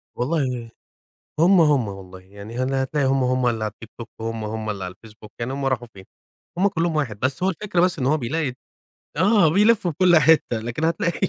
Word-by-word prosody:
والله 125 -4 -2 0.7
هُم، 175 +2 +5
هُم 145 -8 +3
والله، 95 -1 -9
يعني 100 +5 -11
ه 130 - 0 0.2
هتلاقي 135 +1 -1
هُم، 135 0 +2
هُم 130 0 +1
اللي 115 -2 -1
على 105 - -3
الTikTok 115 +1 -11 0.2
هُم 115 -1 -4
هُم 110 0 -4
اللي 100 -3 -4
على 90 0 -6
الFacebook 110 0 -15
يعني 120 +2 -3
هُم 140 0 -3
راحوا 125 -3 -1
فين؟ 95 -1 -13 0.5
هُم 195 - +3
كلّهم 170 -4 -1
واحد، 115 -9 -2
بس 135 +6 -1
هو 190 - +3
الفكرة 190 -1 -1
بس 180 -3 +1
إن 130 - -1
هو 150 +3 +2
بيلاقي 145 +1 -2 0.6
آه 190 0 +4
بيلفوا 200 +2 +3
في 150 - -9
كل 180 -2 +6
حِتّة 155 -6 +4
لكن 120 +8 -4
هتلاقي 170 +3 0
130 Hz, 200 wpm, -22 LUFS, 115-165 Hz, 0.7 s, كل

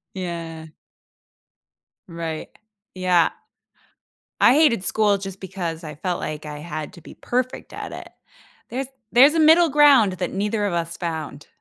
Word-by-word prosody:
Yeah. 165 -3 -6 1.4
Right, 165 -2 -5 0.5
yeah. 180 -2 +3 1.1
I 240 - +6
hated 290 -11 +3
school 205 0 +2
just 195 -1 -8
because 180 -4 -5
I 150 -2 -7
felt 175 +3 -3
like 155 0 -5
I 150 -1 -7
had 155 -2 -6
to 170 - -14
be - - -13
perfect 255 +1 -3
at - - -7
it. - - -9 0.6
There's 260 +1 -4 0.2
there's 270 +5 +7
a - - +2
middle 320 +2 +6
ground 275 -9 +5
that 180 -1 -4
neither 205 +2 -1
of 195 - -1
us 165 -1 -3
found. 160 -4 -5
185 Hz, 145 wpm, -22 LUFS, 165-235 Hz, 1.4 s, there's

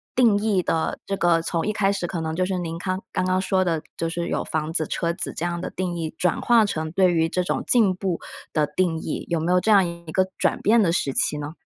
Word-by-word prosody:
定 230 -5 +5
义 205 -3 +1
的 165 -2 -1
这 195 - -2
个 170 -1 +3
从 165 0 -2
一 210 - +1
开 195 -2 +2
始 195 -3 -2
可 170 -2 -4
能 160 0 -3
就 185 +1 +1
是 185 -1 -2
您 165 -1 -4
康 185 +2 -3
刚 - - 0
刚 185 0 +1
说 190 0 +1
的， 165 -3 0 0.2
就 165 - -1
是 170 0 -3
有 - - -1
房 160 0 -3
子、 155 -2 0
车 170 0 -1
子 180 - -5
这 170 - -3
样 175 0 -2
的 - - -4
定 180 -1 -3
义 160 -2 -4
转 180 -2 0
化 230 -3 +5
成 160 -5 -3
对 180 +1 +3
于 165 -1 +2
这 180 - 0
种 - - -2
进 210 -7 +4
步 185 -2 -2 0.3
的 150 -2 +2
定 175 -3 0
义， - - -4
有 170 - +1
没 165 +3 0
有 180 - +5
这 220 - +2
样 195 -3 +6
一 170 -1 -8
个 185 +3 +2
转 - - +1
变 225 +2 +4
的 170 - +2
时 140 -5 0
期 150 - +1
呢？ 150 +2 -5
175 Hz, 290 characters per minute, -23 LUFS, 165-190 Hz, 0.3 s, 样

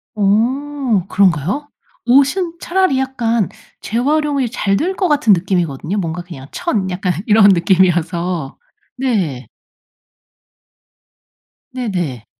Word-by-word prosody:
어 235 +2 0
그런가요? 195 - +1 0.4
옷은 290 +8 +2
차라리 370 -7 +1
약간 235 -5 0 0.3
재활용이 280 +2 0
잘 205 -4 0
될 370 - -1
것 375 - 0
같은 290 -9 +4
느낌이거든요. 175 -1 -1
뭔가 175 -2 -3
그냥 145 -7 -11
천 215 - -2
약간 180 0 -1
이런 210 -2 +6
느낌이어서. 175 -4 +1 0.4
네. 185 - -1 2.2
네네. 180 - -3
205 Hz, 215 characters per minute, -17 LUFS, 175-270 Hz, 2.2 s, 이런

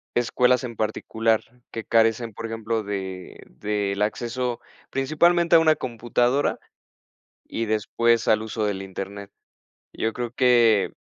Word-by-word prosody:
escuelas 125 +1 +2
en 120 -2 -6
particular 110 +1 0 0.3
que 115 - -5
carecen, 115 +1 +2
por 115 - -7
ejemplo, 115 0 -2
de 95 -2 -6 0.2
del 100 -1 -1
acceso, 120 +3 -2 0.3
principalmente 170 +5 +3
a 165 - +9
una 155 -1 +4
computadora 120 +2 0 0.9
y 115 0 -3
después 115 +2 +1
al 110 0 +3
uso 110 0 -3
del 100 -2 -2
Internet. 100 +1 -7 0.6
Yo 110 - -1
creo 120 -1 -4
que, 120 -5 +4
115 Hz, 125 wpm, -24 LUFS, 105-125 Hz, 0.9 s, a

